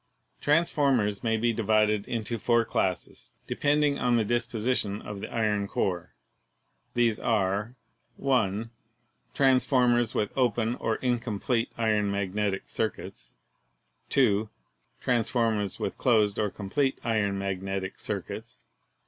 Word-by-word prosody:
Transformers 140 Hz, -9 st, +2 dB
may 110 Hz, -1 st, +1 dB
be 115 Hz, +1 st, +1 dB
divided 105 Hz, -1 st, +2 dB
into 115 Hz, 0 st, -3 dB
four 120 Hz, +1 st, +2 dB
classes, 95 Hz, -4 st, -2 dB
de -, -, -3 dB
pending 145 Hz, 0 st, +2 dB
on 125 Hz, -1 st, +2 dB
the 110 Hz, -, +1 dB
disposition 115 Hz, -2 st, 0 dB
of 105 Hz, -1 st, -7 dB
the -, -, -7 dB
iron 105 Hz, -3 st, 0 dB
core. 90 Hz, -8 st, -2 dB, 0.8 s
These 120 Hz, -3 st, +2 dB
are: 100 Hz, +4 st, 0 dB, 0.4 s
(1) 115 Hz, -5 st, 0 dB, 0.6 s
Transformers 125 Hz, -3 st, +3 dB
with 105 Hz, -, -1 dB
open 120 Hz, -3 st, +1 dB
or 115 Hz, -2 st, -1 dB
incomplete 120 Hz, -1 st, -1 dB
iron 110 Hz, -3 st, +1 dB
mag 100 Hz, -2 st, -2 dB
netic 100 Hz, -2 st, -1 dB
circuits. 110 Hz, -3 st, -4 dB, 0.7 s
(2) 110 Hz, -5 st, +3 dB, 0.5 s
Transformers 115 Hz, -4 st, +1 dB
with -, -, -3 dB
closed 105 Hz, -5 st, +3 dB
or 105 Hz, -1 st, +1 dB
complete 130 Hz, +8 st, -1 dB
iron 105 Hz, -3 st, 0 dB
mag 95 Hz, -1 st, -3 dB
netic 95 Hz, 0 st, -4 dB
circuits. 110 Hz, +4 st, -5 dB
110 Hz, 120 wpm, -27 LUFS, 100-120 Hz, 0.8 s, Transformers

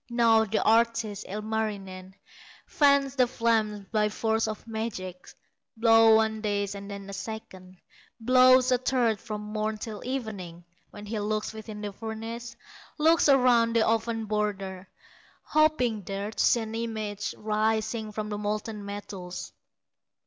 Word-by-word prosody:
Now 230 Hz, -2 st, +4 dB
the 215 Hz, +1 st, 0 dB
artist, 225 Hz, -2 st, +2 dB
Ilmarinen, 200 Hz, -3 st, -4 dB, 0.5 s
Fans 280 Hz, -2 st, +3 dB
the 255 Hz, -2 st, +4 dB
flames 220 Hz, -4 st, 0 dB
by 210 Hz, -1 st, +2 dB
force 220 Hz, +1 st, 0 dB
of 215 Hz, -1 st, -6 dB
magic; 220 Hz, -5 st, -5 dB, 0.5 s
Blows 225 Hz, -1 st, +6 dB
one 220 Hz, 0 st, +1 dB
day, 205 Hz, -1 st, 0 dB
and 200 Hz, 0 st, -8 dB
then 200 Hz, -1 st, -7 dB
a 200 Hz, -, -8 dB
second, 195 Hz, -3 st, -8 dB, 0.4 s
Blows 255 Hz, +2 st, +5 dB
a 250 Hz, -, +3 dB
third 240 Hz, -4 st, +1 dB
from 215 Hz, -2 st, -6 dB
morn 215 Hz, +1 st, -3 dB
till 210 Hz, -1 st, -7 dB
evening, 200 Hz, -10 st, -5 dB, 0.2 s
When 205 Hz, -, -10 dB
he 215 Hz, +1 st, -3 dB
looks 215 Hz, +1 st, -2 dB
within 220 Hz, -1 st, -8 dB
the 205 Hz, -1 st, -5 dB
furnace, 225 Hz, +2 st, -6 dB, 0.4 s
Looks 320 Hz, 0 st, +4 dB
around 245 Hz, -4 st, +4 dB
the 225 Hz, -, +4 dB
oven 225 Hz, 0 st, 0 dB
border, 195 Hz, -3 st, -3 dB, 0.5 s
Hoping 300 Hz, -8 st, +2 dB
there 200 Hz, +2 st, -4 dB
to -, -, 0 dB
see 235 Hz, -, +4 dB
an 220 Hz, 0 st, -6 dB
image 215 Hz, -3 st, -4 dB
Rising 220 Hz, +1 st, -1 dB
from 210 Hz, 0 st, -4 dB
the 205 Hz, -1 st, -4 dB
molten 210 Hz, 0 st, -3 dB
metals. 200 Hz, -3 st, -7 dB
220 Hz, 140 wpm, -27 LUFS, 205-230 Hz, 0.5 s, Blows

